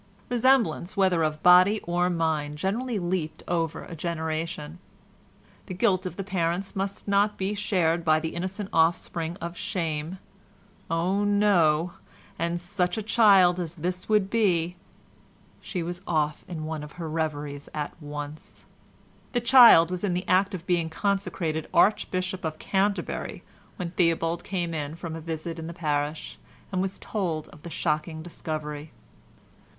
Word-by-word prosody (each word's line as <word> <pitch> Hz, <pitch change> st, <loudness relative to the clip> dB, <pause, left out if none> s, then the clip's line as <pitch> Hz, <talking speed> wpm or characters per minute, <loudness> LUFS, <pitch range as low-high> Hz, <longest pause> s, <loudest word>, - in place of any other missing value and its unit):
Resemblance, 230 Hz, -7 st, +2 dB
whether 185 Hz, -4 st, +3 dB
of 155 Hz, -1 st, -1 dB
body 185 Hz, +4 st, +7 dB
or 175 Hz, +1 st, 0 dB
mind, 160 Hz, -4 st, -1 dB
generally 225 Hz, +8 st, -1 dB
leaped 175 Hz, -3 st, -2 dB
over 165 Hz, -2 st, -1 dB
a 170 Hz, -, -8 dB
generation. 160 Hz, -1 st, -4 dB, 0.9 s
The 185 Hz, -, -5 dB
guilt 185 Hz, 0 st, +2 dB
of 175 Hz, -, -7 dB
the 195 Hz, -, -4 dB
parents 180 Hz, 0 st, -2 dB
must 195 Hz, +1 st, -3 dB
not 205 Hz, +1 st, +2 dB
be 195 Hz, +2 st, -1 dB
shared 175 Hz, -5 st, +1 dB
by 155 Hz, -1 st, +4 dB
the 160 Hz, 0 st, -4 dB
innocent 190 Hz, +3 st, -4 dB
offspring 165 Hz, +1 st, +1 dB
of 170 Hz, +1 st, -5 dB
shame—oh! 180 Hz, +2 st, -4 dB
no—and 175 Hz, -3 st, +1 dB
such 180 Hz, +2 st, -1 dB
a 220 Hz, -, -2 dB
child 200 Hz, -5 st, +5 dB
as 170 Hz, -2 st, -4 dB
this 180 Hz, +4 st, -4 dB
would 210 Hz, -2 st, +2 dB
be... 180 Hz, -6 st, +2 dB, 0.9 s
She 180 Hz, -4 st, -4 dB
was 175 Hz, +2 st, -5 dB
off 150 Hz, -2 st, 0 dB
in 160 Hz, -3 st, -5 dB
one 155 Hz, -1 st, -4 dB
of 150 Hz, 0 st, -9 dB
her 170 Hz, -2 st, -6 dB
reveries 150 Hz, -3 st, -3 dB
at 150 Hz, -1 st, -4 dB
once. 145 Hz, +1 st, -8 dB, 0.7 s
The 245 Hz, -, +2 dB
child 235 Hz, -9 st, +8 dB
was 180 Hz, +1 st, -3 dB
in 185 Hz, -4 st, +1 dB
the 180 Hz, -, -3 dB
act 190 Hz, +2 st, +3 dB
of 175 Hz, -1 st, -8 dB
being 170 Hz, -2 st, +1 dB
consecrated 170 Hz, -4 st, -1 dB
Archbishop 185 Hz, -3 st, +2 dB
of 155 Hz, -1 st, -3 dB
Canterbury 200 Hz, +3 st, -1 dB, 0.3 s
when 175 Hz, -3 st, -4 dB
Theobald 165 Hz, -1 st, +1 dB
came 175 Hz, -3 st, -2 dB
in 150 Hz, -1 st, -3 dB
from 165 Hz, -1 st, -6 dB
a 165 Hz, -, -6 dB
visit 165 Hz, +1 st, -5 dB
in 160 Hz, -, -6 dB
the 170 Hz, -, -7 dB
parish, 150 Hz, -1 st, -2 dB, 0.3 s
and 185 Hz, -1 st, 0 dB
was 195 Hz, 0 st, -3 dB
told 170 Hz, -7 st, -3 dB
of 150 Hz, -, -15 dB
the 170 Hz, -, -8 dB
shocking 160 Hz, 0 st, -2 dB
discovery. 155 Hz, -3 st, -6 dB
175 Hz, 145 wpm, -26 LUFS, 160-190 Hz, 0.9 s, child